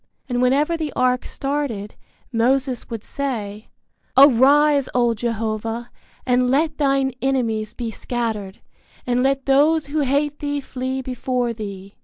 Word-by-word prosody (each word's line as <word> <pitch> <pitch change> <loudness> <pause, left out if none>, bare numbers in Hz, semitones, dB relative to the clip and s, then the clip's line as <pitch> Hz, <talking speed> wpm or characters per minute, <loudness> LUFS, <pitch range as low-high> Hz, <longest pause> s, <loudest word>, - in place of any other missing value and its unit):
And 245 -1 -1
whenever 280 +6 +2
the 315 -3 -3
ark 250 0 +1
started, 270 -8 -3 0.4
Moses 255 +2 +1
would 230 -3 -5
say, 215 -7 -4 0.5
Arise, 280 +2 +6
O 240 -1 +3
Jehovah, 225 +1 -3 0.3
And 250 0 +2
let 300 +3 +1
thine 275 -2 +2
enemies 230 -5 -1
be 235 -2 -4
scattered, 220 -5 -4 0.4
And 250 0 +1
let 270 0 +1
those 295 +3 +3
who 290 +2 -2
hate 290 +1 0
thee 290 -1 -2
flee 260 -1 -4
before 250 -1 -2
thee. 200 -3 -8
255 Hz, 130 wpm, -21 LUFS, 230-280 Hz, 0.5 s, Arise